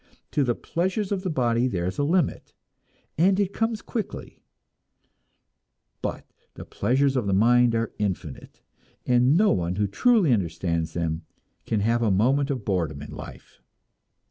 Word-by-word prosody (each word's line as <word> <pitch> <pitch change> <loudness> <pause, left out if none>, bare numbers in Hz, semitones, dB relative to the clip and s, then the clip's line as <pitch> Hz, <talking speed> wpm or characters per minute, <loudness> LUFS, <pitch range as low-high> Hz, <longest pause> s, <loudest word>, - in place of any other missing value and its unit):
To 145 - +1
the 120 -3 0
pleasures 190 +4 -2
of 195 -2 -1
the 185 - -3
body 120 -4 +1
there 90 -8 -2
is 95 +7 -3
a - - +2
limit, 165 +1 0 0.6
and 190 +3 +4
it 200 -1 0
comes 225 -1 -1
quickly; 220 -4 -6 1.6
but - - -4 0.3
the - - -9
pleasures 135 +2 +1
of 120 -6 0
the 95 - +2
mind 120 +3 +4
are 115 0 -1
infinite, 95 -8 -4 0.4
and 125 +4 +4
no 210 +2 +4
one 90 -1 -1
who 105 +2 +1
truly 185 - +3
understands 85 -4 -1
them 80 -1 -2 0.5
can 110 -2 0
have 115 +3 +1
a 115 - +2
moment 130 +9 +2
of 130 -7 -3
boredom 80 -7 -1
in - - -10
life. - - -11
120 Hz, 155 wpm, -25 LUFS, 95-155 Hz, 1.6 s, and